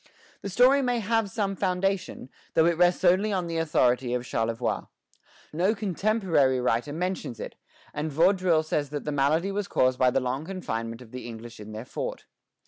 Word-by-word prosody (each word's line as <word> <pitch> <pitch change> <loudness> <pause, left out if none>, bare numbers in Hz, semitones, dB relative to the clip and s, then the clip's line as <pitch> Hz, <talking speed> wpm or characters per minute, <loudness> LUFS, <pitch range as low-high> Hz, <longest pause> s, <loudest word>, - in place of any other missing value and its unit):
The 200 - -5
story 255 +8 +5
may 245 -2 +1
have 225 -1 0
some 200 -2 -2
foundation, 190 -6 -1 0.3
though 160 - +5
it 170 0 +3
rests 175 +2 +3
only 190 +4 +4
on 185 -3 -1
the 165 -1 -3
authority 125 -5 +2
of 125 0 -3
Charlevoix. 115 0 -2 0.7
No 185 +7 +2
contemporary 190 - +1
writer 125 +2 0
mentions 175 -7 -3
it; - - -6 0.4
and 150 +1 -3
Vaudreuil 175 +1 +3
says 150 -2 -1
that 145 -1 -5
the 150 - -2
malady 150 +7 +1
was 200 0 -2
caused 130 -6 +2
by 130 - +5
the 135 - +1
long 130 +3 -2
confinement 115 -10 -5
of 110 - -17
the 125 -1 -7
English 115 0 -9
in 105 0 -9
their 110 +2 -7
fort. - - -5
160 Hz, 180 wpm, -27 LUFS, 125-195 Hz, 0.7 s, story